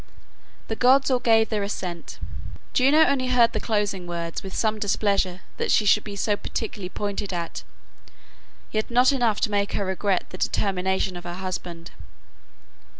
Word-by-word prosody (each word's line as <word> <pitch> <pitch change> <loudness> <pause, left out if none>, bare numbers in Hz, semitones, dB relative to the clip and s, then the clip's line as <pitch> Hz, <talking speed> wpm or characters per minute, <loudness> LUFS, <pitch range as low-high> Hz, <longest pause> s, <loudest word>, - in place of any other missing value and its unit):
The 220 - -2
gods 265 +4 +4
all 255 - +3
gave 225 -2 +4
their 215 -2 -1
assent; 180 -4 -5 0.6
Juno 290 +5 +5
only 265 -2 +1
heard 245 -2 +4
the - - 0
closing 205 -5 -1
words 170 -1 -4
with 190 -1 -8
some 220 -1 0
displeasure 200 -3 0 0.2
that - - -1
she 210 - +4
should 210 +1 +4
be 205 -2 -7
so 205 +1 +1
particularly 205 -3 -5
pointed 205 0 -3
at, 170 - -4 1.1
yet 215 0 -1
not 250 +2 +5
enough 240 -6 +1
to 215 - +1
make 200 0 0
her 200 - -1
regret 190 0 0
the 185 - -8
determination 190 -1 0
of 175 - -7
her 175 0 -6
husband. 180 -2 -6
205 Hz, 160 wpm, -24 LUFS, 185-225 Hz, 1.1 s, Juno